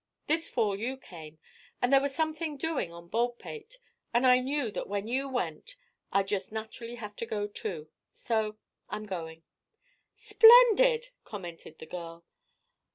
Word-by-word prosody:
This 320 +2 +1
fall 215 -5 +1
you 255 +4 -3
came, 160 -9 -12 0.4
and 245 +2 +1
there 270 - +7
was 280 -1 -2
something 315 -1 -2
doing 280 - -2
on 170 0 -12
Baldpate 245 - -3 0.4
and 240 +2 +4
I 250 0 +7
knew 265 -2 -1
that - - -5
when 205 +1 -2
you 265 +3 -1
went, 250 - -3 0.4
I'd 195 0 +2
just 195 -1 -2
naturally 225 +2 -6
have 210 -3 -8
to - - -3
go, 210 -2 -2
too. 190 -6 -5 0.2
So 220 -2 -2 0.3
I'm 215 - -5
going." 165 -4 -6 0.7
"Splendid," 485 +1 +7
commented 175 -5 -9
the - - -10
girl. 170 0 -8
225 Hz, 150 wpm, -29 LUFS, 190-280 Hz, 0.7 s, there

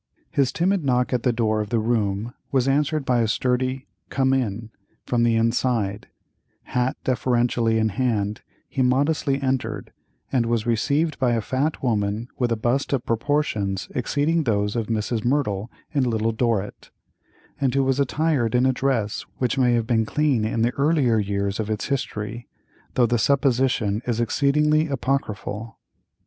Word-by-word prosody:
His 135 -2 +2
timid 185 +1 +1
knock 125 -2 +1
at 125 - +1
the 125 - +2
door 110 -2 0
of 105 - -5
the 115 - +1
room 110 0 0 0.2
was 130 -1 +2
answered 145 +1 +1
by 125 -2 +2
a 115 - +1
sturdy 130 +3 0 0.2
"Come 135 -1 +2
in," 115 -3 -2 0.3
from 120 -1 0
the 120 -1 +3
inside; 115 -3 0 0.6
hat 125 +1 -1
deferentially 120 -2 +1
in 110 0 +2
hand 105 -2 -1 0.3
he 135 - -2
modestly 140 +2 +2
entered, 130 -2 -2 0.4
and 120 -3 +1
was 115 -2 0
received 140 +7 0
by 125 -2 +2
a 115 - +1
fat 135 +8 -2
woman 110 -1 -1
with 120 -2 +1
a - - +3
bust 120 +6 0
of 130 -3 -1
proportions 115 -6 -1
exceeding 150 +5 0
those 105 -2 0
of 115 -2 -1
Mrs. 110 0 -1
Merdle 120 -6 0 0.2
in 140 -3 +2
"Little 115 -1 0
Dorrit," 110 -3 -2 0.7
and 135 -2 +1
who 135 - +3
was 135 +1 +1
attired 140 -4 +1
in 125 +1 +4
a 130 - +3
dress 125 -6 -1
which 130 +1 0
may 125 -2 +4
have 115 -1 0
been 115 -2 +1
clean 140 -7 +1
in 110 +1 0
the 120 +2 +1
earlier 140 -6 +3
years 100 0 -1
of 110 -1 -2
its 110 +3 -2
history, 120 -4 -3 0.5
though 125 - +4
the 120 0 +1
supposition 125 -5 +2
is 120 -2 0
exceedingly 150 +6 +2
apocryphal. 115 -5 -3
120 Hz, 160 wpm, -23 LUFS, 110-135 Hz, 0.7 s, in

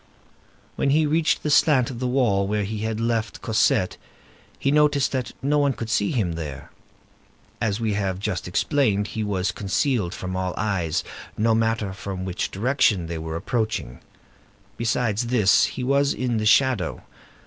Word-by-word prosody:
When - - +1
he 155 +3 +3
reached 155 +1 +1
the 150 - 0
slant 145 -4 +4
of 120 - -7
the 125 - -1
wall 115 -7 +2
where 105 0 0
he 105 +2 -4
had 110 0 -2
left 115 -1 -2
Cosette, 110 -4 +2 0.6
he 140 - 0
noticed 150 -2 +3
that 130 -2 -3
no 145 +2 +2
one 140 -2 +2
could 115 -2 -5
see 100 -2 +1
him 105 -9 0
there. 75 -5 -7 0.9
As 105 -1 0
we 110 -2 0
have 95 -2 -1
just 95 -3 -3
explained, 105 - +1
he 110 - -3
was 100 -2 -1
concealed 100 -2 -1
from 95 0 -5
all 95 -1 -2
eyes, 95 -6 -1 0.3
no 115 +1 +2
matter 110 -3 0
from 95 -1 -6
which 90 -1 -2
direction 105 -4 +1
they 85 0 -5
were 80 0 -5
approaching; 110 - -2 0.8
besides 115 -1 0
this, 110 -5 +4
he 130 - -5
was 140 +2 +2
in 125 -3 -1
the 110 0 0
shadow. 120 -6 +2
110 Hz, 165 wpm, -24 LUFS, 95-125 Hz, 0.9 s, slant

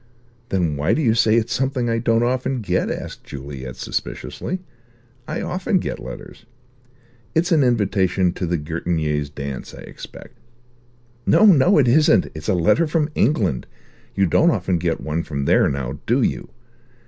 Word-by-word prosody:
"Then 85 -6 0
why 75 +6 +1
do 160 - 0
you 115 -4 +3
say 110 -1 +3
it's 115 0 +1
something 130 -2 -1
I 115 0 0
don't 115 0 +2
often 130 +1 -1
get?" 105 - 0
asked - - -6
Juliet 65 -2 -8
suspiciously; 185 - -4 0.7
"I 155 - -3
often 185 +2 0
get - - -3
letters. - - -10 0.9
It's 170 +4 +1
an 160 -3 +4
invitation 95 -6 +1
to 90 - -3
the 85 +1 0
Gertignés' 75 -2 -2
dance, 70 -2 -7
I - - -11
expect." - - -12 0.9
"No, 215 - +5
no, 180 -1 +6
it 140 -4 +4
isn't. 150 +6 +4
It's 80 -1 -6
a - - +3
letter 90 - +3
from 150 -1 0
England. 95 - +1 0.5
You 100 - +3
don't 160 - +4
often 95 - 0
get 85 -1 -1
one 80 +2 -2
from 70 -4 -4
there, - - +4
now, 70 +1 -4
do 125 +3 +2
you? - - -2
100 Hz, 160 wpm, -21 LUFS, -, 0.9 s, no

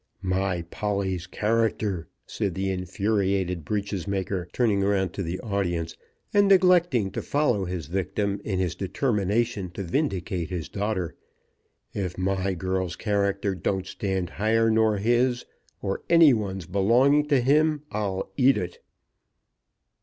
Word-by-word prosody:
"My 95 -2 0
Polly's 95 0 -2
character!" 105 -4 0 0.2
said 100 -6 -3
the 95 0 -1
infuriated 95 -2 -1
breeches 100 +1 -3
maker, 95 -2 -2
turning 110 -5 +2
round 95 -3 +1
to - - -4
the 90 0 -3
audience, 85 -6 -2 0.4
and 205 0 +5
neglecting 180 - +4
to - - -3
follow 125 -9 +1
his 90 -3 -4
victim 100 +4 -2
in 95 -3 -2
his 90 -2 0
determination 105 0 -1
to 100 - -3
vindicate 95 - -1
his 90 -3 -4
daughter. 100 -4 -2 0.8
"If 95 -4 -3
my 95 0 0
girl's 95 0 -2
character 100 -2 0
don't 95 +1 -2
stand 95 -4 -3
higher 115 +2 +2
nor 110 -1 +3
his 120 +4 +1 0.4
or 95 - -2
any 165 -5 +7
one's 95 -5 -3
belonging 120 - +3
to 140 -3 +3
him 150 +3 +2
I'll 100 -3 -2
eat 135 0 +5
it!" 90 -1 -4
100 Hz, 130 wpm, -26 LUFS, 95-115 Hz, 0.8 s, any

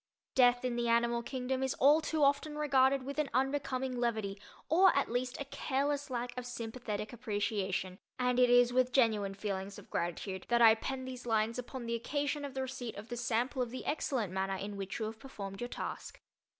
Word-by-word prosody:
Death 245 -1 +4
in 245 -1 -1
the 240 0 0
animal 235 0 +2
kingdom 260 +1 -2
is 265 -1 0
all 295 +4 +5
too 315 -1 0
often 285 +2 +2
regarded 275 -2 +3
with 280 +3 -4
an 300 -3 +1
unbecoming 265 -1 0
levity 220 -4 -1 0.3
or, 370 +4 +6
at 280 - +1
least, 250 +1 -2
a 285 - -3
careless 280 +1 -1
lack 245 -1 -3
of 250 - -4
sympathetic 230 -3 -5
appreciation, 205 -4 -2 0.2
and 250 0 +1
it 250 -1 +6
is 245 0 +5
with 255 0 +3
genuine 215 -6 +2
feelings 195 -1 -4
of - - -13
gratitude 185 +2 -3
that 240 0 +4
I 225 -2 +9
pen 260 +3 -4
these 255 -1 -7
lines 225 +1 +1
upon 250 0 -6
the 230 - -2
occasion 285 +5 -1
of 280 -1 -6
the 265 - -1
receipt 255 -3 -5
of 210 +3 -9
the 240 - -3
sample 245 +2 0
of 245 - -1
the 255 +2 -7
excellent 255 - -1
manner 190 0 -1
in 200 +2 -5
which 195 -1 -4
you 220 - -2
have 220 +1 -6
performed 200 -7 -7
your 240 - -2
task. - - -6
245 Hz, 200 wpm, -33 LUFS, 220-265 Hz, 0.3 s, I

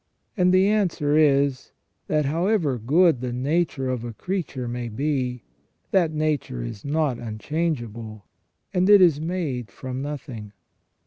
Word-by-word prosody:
And 180 -3 +3
the 185 +1 +5
answer 180 -8 +1
is, 140 -3 +2 0.3
that 155 -1 +1
however 165 - +1
good 150 +4 +3
the 125 -1 -3
nature 135 +2 0
of 125 -2 -2
a 120 -1 -5
creature 150 - -4
may 120 0 -4
be, 125 0 -2 0.5
that 180 -4 +3
nature 150 - -1
is 100 - -7
not 145 -3 0
unchangeable, 115 - -4 0.5
and 185 +1 +2
it 205 -1 +9
is 165 -5 +5
made 155 - -3
from 130 +5 -6
nothing." 130 -8 -6
140 Hz, 135 wpm, -24 LUFS, 125-165 Hz, 0.5 s, it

